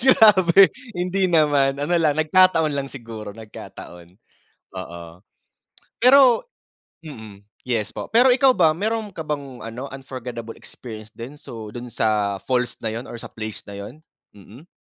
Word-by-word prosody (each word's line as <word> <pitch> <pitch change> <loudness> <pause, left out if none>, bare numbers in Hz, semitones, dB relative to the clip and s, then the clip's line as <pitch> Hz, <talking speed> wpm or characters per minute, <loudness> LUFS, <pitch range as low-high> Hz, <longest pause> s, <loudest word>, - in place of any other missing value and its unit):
Grabe 195 -7 +6 0.2
hindi 185 +1 0
naman 145 -4 +3
ano 145 +5 -1
lang 150 -2 +2
nagkataon 160 -1 +4
lang 140 -1 -3
siguro 115 -5 -9
nagkataon, 90 -5 -11 0.6
oo. 85 -2 -8 1.0
Pero 255 - +6 0.6
mm, 110 -9 -10 0.2
yes 115 -5 -2
po, - - -6
pero 245 +3 +6
ikaw 260 +1 +5
ba 160 -9 +3
mayro'n 215 +2 -2
ka 160 - -5
bang 140 -4 -5
ano, 120 +4 -6
unforgettable 125 -4 -7
experience 110 -3 -11
din? 125 +6 -9
So 110 -5 -9
do'n 120 +2 -7
sa 105 -3 0
falls 125 -1 -1
na 110 - -1
'yun 115 +3 -6
or - - -8
sa - - -9
place 110 -1 -7
na 100 - -10
'yun? 130 +10 -10 0.3
Mm. 110 - -15
135 Hz, 145 wpm, -22 LUFS, 110-175 Hz, 1.0 s, Grabe